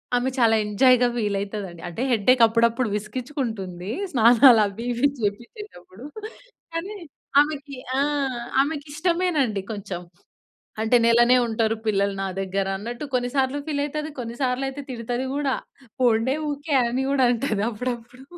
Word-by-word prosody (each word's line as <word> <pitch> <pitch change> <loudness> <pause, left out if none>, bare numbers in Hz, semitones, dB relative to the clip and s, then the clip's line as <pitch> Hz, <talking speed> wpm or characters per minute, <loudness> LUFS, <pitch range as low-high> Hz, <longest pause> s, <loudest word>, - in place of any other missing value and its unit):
ఆమె 245 +2 +1
చాలా 225 -2 +4
ఎంజాయ్‌గా 245 +4 +4
ఫీలైతదండి. 200 -5 -3
అంటే 175 +8 -6
హెడేక్ 240 +2 +3
అప్పుడప్పుడు 230 +2 +2
విసికిచ్చుకుంటుంది 215 -5 -4 0.2
స్నానాలవి 230 -3 +5
ఇవి 240 +4 +2
చెప్పిచ్చేటప్పుడు. 215 - -6 0.7
కానీ, 365 +6 -4 0.5
ఆమెకి 290 -2 -4 0.2
ఆ! - - +2 0.6
ఆమెకిష్టమేనండి 300 - -1
కొంచెం. 195 -4 -5 0.8
అంటే, 225 +2 +3
"నెలనే 240 +2 +5
ఉంటారు 225 -1 0
పిల్లలు 200 -1 +1
నా 195 - -1
దగ్గర" 195 0 -2
అన్నట్టు, 235 +6 -6
కొన్ని 245 -1 +1
సార్లు 270 +1 +1
ఫీలైతది, 300 +1 -2
కొన్నిసార్లు 250 +2 -2
అయితే 285 +2 -6
తిడతది 245 +2 -3
గూడా. 280 -2 0 0.5
"పొండే 240 +2 +3 0.2
ఊకే" 290 +1 -3
అని 250 +3 -1
గూడా 275 -2 +3
అంటది 225 -4 -1
అప్పుడప్పుడు. 240 +2 -6
240 Hz, 120 wpm, -24 LUFS, 215-275 Hz, 0.8 s, స్నానాలవి